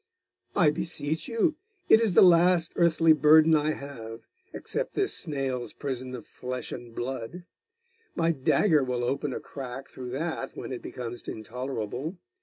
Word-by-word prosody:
'I 165 -6 +5
beseech 160 - -2
you. 255 +6 +1 0.3
It 220 - +7
is 220 -5 +2
the - - +8
last 175 -1 +5
earthly 165 -1 +5
burden 155 +2 +6
I 155 0 +1
have, 115 -6 -8 0.3
except - - -3
this 395 -1 +1
snail's 135 -6 -2
prison 130 -2 -4
of 115 - -9
flesh 125 -1 -6
and 120 -2 -8
blood. 130 +7 -5 0.7
My 165 0 +2
dagger 155 +2 +3
will 125 -1 -2
open 140 +3 -1
a - - -4
crack 135 -1 -8
through 125 -1 -8
that 135 +1 -4
when - - -6
it 125 - -5
becomes 120 -1 -7
intolerable. 125 - -5
140 Hz, 150 wpm, -27 LUFS, 125-165 Hz, 0.7 s, the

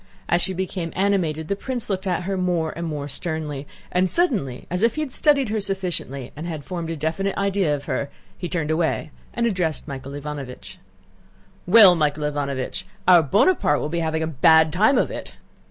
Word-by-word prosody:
As 175 - +2
she 190 - -1
became 180 -2 -3
animated 175 -6 0
the 200 - 0
prince 245 +2 -2
looked 195 -1 -2
at 180 -1 0
her 195 +2 -2
more 175 -4 0
and 170 0 -4
more 145 -2 -4
sternly, 150 -1 -4 0.2
and 180 +1 +2
suddenly, 205 - +1
as 180 +2 -3
if 230 +1 +2
he 310 - -2
had 295 -4 -3
studied 280 -4 +4
her 215 0 -1
sufficiently 180 -10 -3
and 155 +4 -6
had 155 -4 -5
formed 170 -1 -5
a 165 - -2
definite 160 +6 -2
idea 195 -6 +1
of 145 0 -8
her, 140 - -2 0.3
he 175 - -5
turned 160 -3 -1
away 160 -1 -1 0.2
and 235 - -1
addressed 180 -10 -1
Michael 135 -1 -7
Ivánovich. 145 -3 -7 0.9
"Well, 195 -1 +9
Michael 150 -2 0
Ivánovich, 140 -3 -3 0.2
our 180 -2 +8
Bonaparte 160 - +3
will 150 - -3
be 170 +2 -2
having 160 -1 -1
a - - 0
bad 160 +1 +4
time 215 +9 +4
of - - +1
it. - - -7
170 Hz, 190 wpm, -23 LUFS, 150-195 Hz, 0.9 s, Well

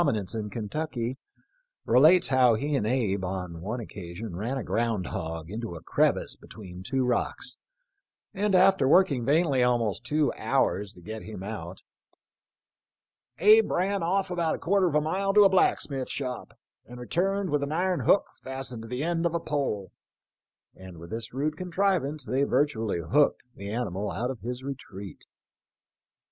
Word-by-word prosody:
nence 105 - -1
in 110 -2 -3
Kentucky, 120 +3 -4 0.7
relates 160 +7 +6
how 130 -3 +5
he 145 +6 -1
and 110 -6 0
Abe 110 -6 0
on 90 -3 -4
one 110 +7 -3
occasion 95 -2 -7
ran 115 +9 -2
a 130 - -3
ground 115 -5 -1
hog 80 +1 -5
into 110 -4 -5
a 80 - -10
crevice - - +1
be - - -17
tween 90 -4 -10
two 130 +6 -1
rocks, 125 -1 -1 0.8
and 200 0 +1
after 185 -6 +5
working 145 -6 +4
vainly 145 -2 +3
almost 120 -4 +1
two 150 +4 +1
hours 100 +1 0
to 90 - -15
get 110 +3 -6
him 105 -3 -8
out, 95 -4 -7 1.5
"Abe 215 +4 +6
ran 195 +2 0
off 185 +3 0
about 170 -3 0
a - - -6
quarter 190 +1 +2
of 155 - -1
a 150 - +4
mile 195 +6 -1
to 210 - +8
a 195 - +7
blacksmith 140 -7 +1
shop, 125 -3 -5 0.3
and 125 +1 -10
returned 190 +8 -1
with 145 -1 +1
an 140 +1 -2
iron 180 +2 +1
hook 200 - +4 0.2
fastened 130 -3 -5
to 115 - -9
the 125 +4 -3
end 170 0 +1
of 170 - -4
a - - +1
pole," 140 - -2 0.8
and 95 -2 -12
with 85 +1 -11
this 115 +1 -5
rude 150 +4 -1
contrivance 180 -5 0
they 130 +5 0
virtually 125 - +1
"hooked 140 - +2
"the 100 -3 -7
animal 105 -3 -2
out 125 +5 -2
of 130 - -8
his 125 +2 -5
retreat. 100 -8 -8
125 Hz, 165 wpm, -27 LUFS, 105-160 Hz, 1.5 s, to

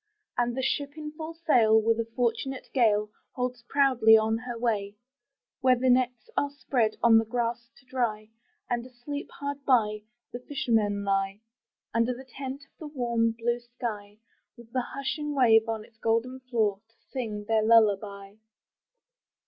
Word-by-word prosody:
And 240 0 0
the 265 - -1
ship 285 +2 -1
in 300 -1 -6
full 315 +1 -7
sail, 240 -10 +4
with 225 +1 +1
a 230 - -1
fortunate 250 +2 -1
gale. 210 -4 +3 0.2
Holds 250 -1 -3
proudly 255 -6 +5
on 220 0 +1
her 240 0 -6
way, 210 -4 -1 0.6
Where 255 -1 +4
the 255 +1 +2
nets 250 -3 +1
are 285 - +1
spread 250 -6 -1
on 225 -1 +7
the - - +1
grass 235 +1 -2
to 270 - -21
dry, 220 -4 -2 0.4
And 240 -1 -1
asleep, 255 +3 -7
hard 285 0 -6
by, 215 -6 +2 0.3
the 245 - -4
fishermen 225 -8 0
lie 195 +1 0 0.5
Under 230 +2 +1
the 260 +2 -11
tent 265 +2 -7
of - - -40
the 310 - -7
warm 235 -5 0
blue 235 +1 -1
sky, 230 -4 -6 0.4
With 235 -1 -15
the 255 - 0
hushing 290 +3 -4
wave 225 -4 +5
on 220 -1 -3
its 220 - -24
golden 230 +4 0
floor 225 -6 0
To 225 - -34 0.2
sing 215 -6 -4
their 225 -1 +3
lullaby! 205 -2 +2
235 Hz, 160 wpm, -28 LUFS, 220-260 Hz, 0.6 s, on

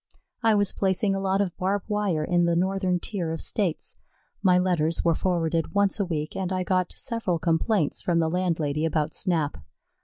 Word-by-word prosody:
I 225 -2 +4
was 205 -2 +2
placing 195 +1 +1
a 195 - -1
lot 195 0 +1
of 185 -3 -2
barb 195 +1 0
wire 205 -7 0
in 175 +2 +2
the 170 0 +2
northern 185 0 +1
tier 175 -4 -3
of 165 - -4
States. 185 -7 -1 0.5
My 185 -3 +4
letters 170 -3 +1
were 170 - +4
forwarded 165 -1 -1
once 200 +1 +3
a 200 - +1
week, 155 -3 -3
and 190 -1 -2
I 185 0 0
got 185 -1 0
several 230 -8 -1
complaints 165 +1 +1
from 175 -2 0
the 165 -1 +2
landlady 160 -4 -1
about 155 -1 0
Snap. 165 -6 -1
180 Hz, 185 wpm, -25 LUFS, 165-195 Hz, 0.5 s, I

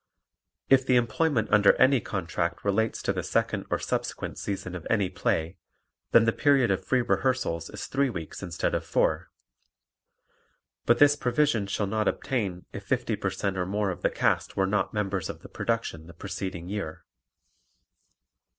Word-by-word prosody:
If 135 0 +5
the 130 - +2
employment 120 +1 +1
under 105 -1 +6
any 130 -1 +4
contract - - -3
relates 110 +2 0
to - - +1
the - - -2
second - - -1
or - - +1
subsequent - - -3
season 95 -3 -4
of 90 -3 -6
any 100 -5 +1
play, 85 -1 -1 0.5
then 115 -1 +6
the 115 - +2
period 135 -6 +3
of 95 - -1
free 130 -2 +1
rehearsals 120 -12 0
is - - -6
three 140 0 +1
weeks 85 -8 -6
instead 85 -3 -2
of - - 0
four, - - 0 1.6
but 120 - +5
this 145 +1 +6
provision 125 -5 +1
shall 100 +1 -1
not 110 +2 -1
obtain 100 -9 -2
if 100 - -6
50 120 +1 -1
per 100 - -1
cent 95 0 -2
or 90 - 0
more 100 0 0
of 90 - -7
the - - +2
cast - - 0
were 95 - +3
not 105 +2 0
members 100 -4 -2
of - - -7
the - - -11
production 115 -9 -3
the 85 - -13
preceding 90 0 -5
year. 95 -5 -5
105 Hz, 170 wpm, -27 LUFS, 95-120 Hz, 1.6 s, under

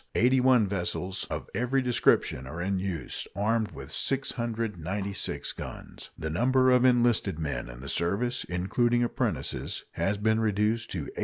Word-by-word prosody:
Eighty 130 +3 +4
one 125 -3 +5
vessels 95 0 -2
of - - -4
every 125 +5 +1
description 115 - +2
are 80 +6 -6
in 95 +2 0
use, 90 -4 -4
armed 110 +2 +1
with - - -10
696 105 - -2
guns. - - -8
The 80 - -3
number 130 +7 +3
of 125 0 +5
enlisted 120 -8 +3
men 75 -6 -3
in - - -10
the 70 - -8
service, 100 - 0
including 120 +7 +1
apprentices, 120 - -2
has 100 +1 0
been 110 +2 +2
reduced 110 +1 +1
to 90 - -2
8,500. 70 - -8
105 Hz, 150 wpm, -28 LUFS, 90-120 Hz, -, one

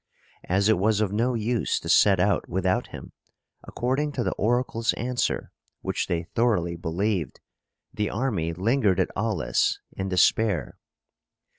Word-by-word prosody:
As 95 +3 +2
it 110 -5 +3
was 105 +1 +2
of 105 -3 0
no 120 +4 0
use 115 0 0
to - - -9
set 100 -3 +5
out 100 +1 +1
without 95 +1 0
him, - - -10 0.5
according 135 +5 -1
to 125 - -1
the - - 0
oracle's 115 +1 0
answer, 125 +1 -2 0.3
which - - -2
they 85 -1 -1
thoroughly 105 -8 +1
believed, 85 +2 -2 0.5
the 105 -1 -1
army 105 -8 -1
lingered 100 +2 +1
at - - +1
Aulis 95 - 0 0.2
in 95 0 -3
despair. 95 +1 +1
105 Hz, 140 wpm, -25 LUFS, 90-115 Hz, 0.5 s, set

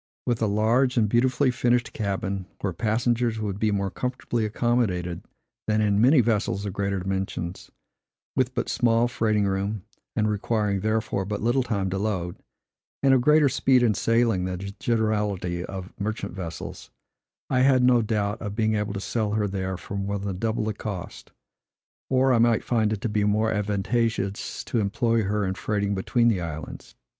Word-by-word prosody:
With 120 -2 0
a 110 - +3
large 115 +5 +2
and 110 -2 +4
beautifully 125 +4 +2
finished 120 0 +1
cabin, 100 -2 -2
where 95 -3 -1
passengers 115 +3 0
would 100 -2 -3
be 110 - +2
more 100 -2 -1
comfortably 125 -2 -2
accommodated 105 -7 0 0.5
than 110 0 +2
in 105 -1 +2
many 130 +3 +6
vessels 105 -3 0
of 100 - -3
greater 100 0 -1
dimensions; 95 -2 -4 0.7
with 130 -1 0
but 120 - -1
small 115 0 +2
freighting 110 -3 +1
room, 100 +1 -1 0.3
and 110 - +2
requiring, 105 -1 0
therefore, 110 -1 0
but 105 +2 -4
little 120 +3 +2
time 100 -6 -1
to 95 - -1
load, 95 -5 -2 0.7
and 135 -1 +5
of 130 - +4
greater 150 +2 +5
speed 130 -2 +3
in 115 -3 +4
sailing 115 -3 +2
than 90 0 -3
the 100 +2 -6
generality 105 -6 0
of 95 0 -7
merchant 105 0 -3
vessels, 85 -4 -7 0.6
I 130 - +3
had 130 -1 +4
no 125 -1 +5
doubt 105 -1 -1
of 105 -2 -4
being 110 -1 +1
able 105 -1 -1
to 100 - -3
sell 105 +1 -1
her 105 -1 +1
there 95 -1 -3
for 100 - -8
more 100 +1 -2
than 100 -2 -4
double 110 0 0
the 110 - -1
cost; 100 -3 -7 0.8
or 130 0 +3
I 120 - +3
might 115 -1 +3
find 110 -3 +1
it 105 -2 -2
to - - -1
be 105 0 +1
more 105 +2 +2
advantageous 105 0 -1
to 120 - -1
employ 115 +2 +1
her 105 +1 0
in 95 - -1
freighting 100 0 -1
between 120 +5 +1
the 105 -6 +2
islands. 80 -2 -7
105 Hz, 175 wpm, -25 LUFS, 100-120 Hz, 0.8 s, many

